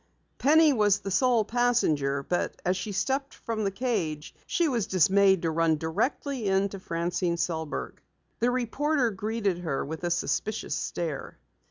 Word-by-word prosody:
Penny 310 Hz, +1 st, +5 dB
was 205 Hz, -4 st, +3 dB
the 195 Hz, -, -5 dB
sole 235 Hz, +2 st, +3 dB
passenger, 160 Hz, -, +1 dB
but 175 Hz, +5 st, -2 dB
as 180 Hz, +1 st, +2 dB
she 190 Hz, +3 st, -4 dB
stepped 270 Hz, +8 st, -1 dB
from 225 Hz, -2 st, -3 dB
the 200 Hz, -, +1 dB
cage, 195 Hz, -, -2 dB
she 350 Hz, -5 st, +1 dB
was 240 Hz, -8 st, 0 dB
dismayed 190 Hz, +1 st, +4 dB
to 165 Hz, -, +1 dB
run 160 Hz, -1 st, +2 dB
directly 230 Hz, -, -2 dB
into 195 Hz, +1 st, +1 dB
Francine 170 Hz, 0 st, -1 dB
Sellberg. 160 Hz, -2 st, -3 dB, 0.4 s
The 240 Hz, -, +2 dB
reporter 255 Hz, +2 st, 0 dB
greeted 205 Hz, -2 st, -2 dB
her 160 Hz, -6 st, -2 dB
with 160 Hz, +4 st, -6 dB
a 175 Hz, -, 0 dB
suspicious 210 Hz, +5 st, -1 dB
stare. 160 Hz, -5 st, -4 dB
195 Hz, 150 wpm, -27 LUFS, 170-240 Hz, 0.4 s, Penny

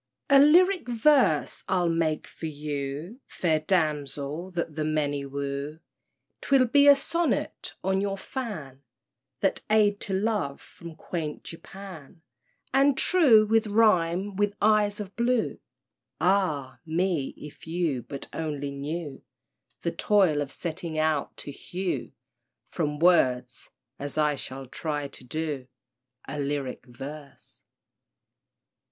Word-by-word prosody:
_ 280 Hz, -, +6 dB
A -, -, +9 dB
lyric 350 Hz, +2 st, +5 dB
verse 240 Hz, -, +3 dB
I'll 180 Hz, -2 st, +2 dB
make 165 Hz, -2 st, 0 dB
for 165 Hz, -, -7 dB
you, 150 Hz, -, -5 dB
Fair 160 Hz, -3 st, 0 dB
damsel 155 Hz, -1 st, -1 dB
that 170 Hz, -4 st, -4 dB
the 155 Hz, -, -1 dB
many 145 Hz, -2 st, -1 dB
woo, 140 Hz, +2 st, -4 dB, 0.6 s
'Twill 270 Hz, -2 st, +4 dB
be 285 Hz, +4 st, +5 dB
a 285 Hz, -, +10 dB
sonnet 335 Hz, +4 st, -2 dB
on 190 Hz, 0 st, +1 dB
your 200 Hz, -1 st, -1 dB
fan— 190 Hz, -, -6 dB, 0.6 s
That 195 Hz, -, +1 dB
aid 210 Hz, -1 st, +4 dB
to 195 Hz, -, -4 dB
love 200 Hz, -8 st, -1 dB
from 170 Hz, -2 st, -12 dB
quaint 155 Hz, -3 st, -5 dB
Japan— 170 Hz, -3 st, -11 dB, 0.5 s
And 275 Hz, 0 st, +4 dB
"true" 265 Hz, -13 st, +5 dB
will 225 Hz, +1 st, +3 dB
rhyme 195 Hz, -3 st, +3 dB
with 205 Hz, +1 st, 0 dB
"eyes 210 Hz, -1 st, +3 dB
of 200 Hz, -2 st, -7 dB
blue." 235 Hz, 0 st, 0 dB, 0.6 s
Ah! 175 Hz, -8 st, +1 dB
me, 165 Hz, -3 st, -1 dB
if 150 Hz, +1 st, -11 dB
you 160 Hz, -6 st, -1 dB
but 140 Hz, +3 st, -6 dB
only 145 Hz, -3 st, -3 dB
knew 145 Hz, +2 st, -5 dB, 0.6 s
The 170 Hz, -, 0 dB
toil 185 Hz, -9 st, +3 dB
of 140 Hz, -, -4 dB
setting 165 Hz, -1 st, -4 dB
out 155 Hz, -2 st, 0 dB
to 145 Hz, -, -7 dB
hew 180 Hz, +5 st, -4 dB, 0.6 s
From 150 Hz, -3 st, -1 dB
words—as 130 Hz, -4 st, 0 dB
I 150 Hz, -1 st, +3 dB
shall 135 Hz, -1 st, -7 dB
try 145 Hz, +2 st, -4 dB
to 135 Hz, -, -13 dB
do— 145 Hz, -1 st, -4 dB, 0.6 s
A 145 Hz, +2 st, -5 dB
lyric 140 Hz, -3 st, -3 dB
verse. 140 Hz, +3 st, -10 dB
165 Hz, 125 wpm, -27 LUFS, 145-205 Hz, 0.6 s, a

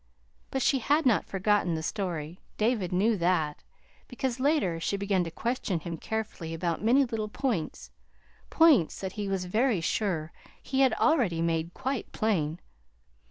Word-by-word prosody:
But 265 Hz, -1 st, -1 dB
she 270 Hz, -, +3 dB
had 295 Hz, +6 st, +2 dB
not 235 Hz, -5 st, +3 dB
forgotten 195 Hz, -3 st, +1 dB
the 160 Hz, -, -4 dB
story. 175 Hz, -4 st, -3 dB, 0.2 s
David 215 Hz, -5 st, +1 dB
knew 205 Hz, +5 st, +2 dB
that, 170 Hz, -4 st, 0 dB, 0.4 s
because 250 Hz, 0 st, -3 dB
later 265 Hz, -, +1 dB
she 200 Hz, +4 st, -1 dB
began 195 Hz, -2 st, +1 dB
to -, -, -4 dB
question 215 Hz, -1 st, -2 dB
him 170 Hz, 0 st, -5 dB
carefully 205 Hz, -6 st, -4 dB
about 170 Hz, +2 st, -2 dB
many 260 Hz, +5 st, +4 dB
little 220 Hz, -3 st, -3 dB
points 210 Hz, -, -3 dB, 0.6 s
points 305 Hz, -, +4 dB
that 190 Hz, -1 st, -4 dB
he 205 Hz, 0 st, -4 dB
was 190 Hz, -2 st, -1 dB
very 220 Hz, +3 st, +1 dB
sure 165 Hz, -2 st, -1 dB, 0.3 s
he 265 Hz, -, -3 dB
had 265 Hz, -3 st, +5 dB
already 230 Hz, -, +2 dB
made 165 Hz, 0 st, -1 dB
quite 265 Hz, -2 st, -3 dB
plain. 170 Hz, -7 st, 0 dB
200 Hz, 155 wpm, -28 LUFS, 170-245 Hz, 0.6 s, had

